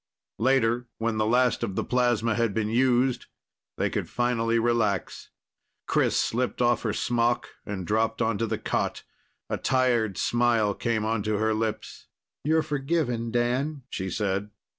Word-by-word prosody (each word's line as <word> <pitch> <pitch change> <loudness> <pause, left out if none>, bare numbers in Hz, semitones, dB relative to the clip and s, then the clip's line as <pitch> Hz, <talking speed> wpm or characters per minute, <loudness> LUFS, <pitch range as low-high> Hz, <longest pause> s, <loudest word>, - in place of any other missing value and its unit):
Later, 120 -1 +2
when 115 -1 -1
the 110 0 +1
last 125 +1 +2
of 95 - -2
the - - 0
plasma 120 -2 +1
had 115 -3 0
been 110 -1 0
used, 125 +1 +2 0.5
they - - +1
could - - -3
finally 115 -1 +1
relax. 115 -5 0 0.6
Chris - - +2
slipped 125 +2 -1
off 120 -1 +3
her 110 - -1
smock 120 +2 0 0.2
and 95 -4 -4
dropped 110 +3 0
onto 115 -1 0
the - - -1
cot. - - -2 0.4
A - - -2
tired 120 -7 +1
smile 115 -2 +2
came 110 0 -1
onto 110 -1 0
her 110 +1 +1
lips. 110 0 -4 0.4
"You're 160 +1 +2
forgiven, 135 -5 -1
Dan," 125 +5 -1
she 95 0 -3
said. 100 +1 -1
115 Hz, 145 wpm, -26 LUFS, 110-125 Hz, 0.6 s, off